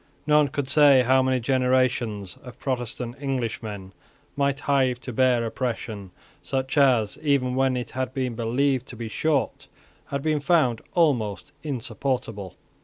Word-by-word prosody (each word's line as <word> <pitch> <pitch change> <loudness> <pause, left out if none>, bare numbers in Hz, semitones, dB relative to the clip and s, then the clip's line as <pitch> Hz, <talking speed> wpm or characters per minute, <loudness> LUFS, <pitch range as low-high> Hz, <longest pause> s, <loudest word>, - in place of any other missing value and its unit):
None 150 -1 +4
could 140 0 -3
say 140 -2 +6
how 130 +2 +4
many 130 0 +1
generations 125 -6 0
of 125 -3 -12
Protestant 125 -2 -4
Englishmen 115 -7 -4 0.4
might 140 0 0
hive 130 -4 +1
to 125 - -6
bear 125 -1 +3
oppression, 115 -4 -4 0.3
such 135 +1 -3
as, 125 -7 +3
even 140 -4 +1
when 130 0 +1
it 120 -2 -5
had 130 +1 -3
been 130 -2 -2
believed 125 +3 0
to - - -9
be 115 0 -5
short, 140 0 -1 0.4
had 140 0 -3
been 155 -1 +1
found 145 -7 +2
almost 120 - +1
insupportable. 125 - -4
130 Hz, 140 wpm, -25 LUFS, 115-140 Hz, 0.4 s, say